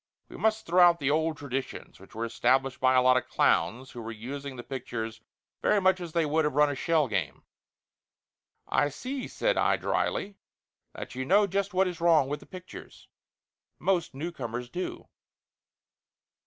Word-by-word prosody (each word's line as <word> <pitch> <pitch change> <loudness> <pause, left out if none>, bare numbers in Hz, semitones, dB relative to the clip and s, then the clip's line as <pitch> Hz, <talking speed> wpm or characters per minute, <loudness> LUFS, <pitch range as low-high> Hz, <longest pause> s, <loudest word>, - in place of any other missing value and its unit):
We - - -11
must 220 0 0
throw 180 +2 +4
out 175 -1 +7
the 140 -1 +1
old 160 +1 +1
traditions, 135 -2 -5
which - - -16
were 115 +1 -2
established 130 +3 +1
by 130 0 +4
a 125 - +5
lot 130 0 +5
of - - -2
clowns 130 +3 +1
who 120 - -8
were 115 0 -6
using 135 +5 -7
the 120 - -8
pictures 115 -4 -5 0.4
very 210 - +3
much 185 -1 +3
as 170 -2 -6
they 165 -2 +2
would 155 +2 +1
have 150 -3 -1
run 150 0 +4
a - - -4
shell 155 +1 +1
game." 95 -9 -3 1.2
"I 145 - +2
see," 255 - -5
said - - 0
I - - +3
dryly, 200 0 -1 0.6
"that - - -7
you 130 +1 -3
know 200 +9 +4
just 195 0 -2
what 190 +1 +3
is 175 -2 -6
wrong 165 -5 +4
with 145 - -3
the - - -16
pictures. 185 -1 -11 0.7
Most 175 -7 0
newcomers 125 -6 -5
do." 180 +1 -5
145 Hz, 175 wpm, -28 LUFS, 130-180 Hz, 1.2 s, out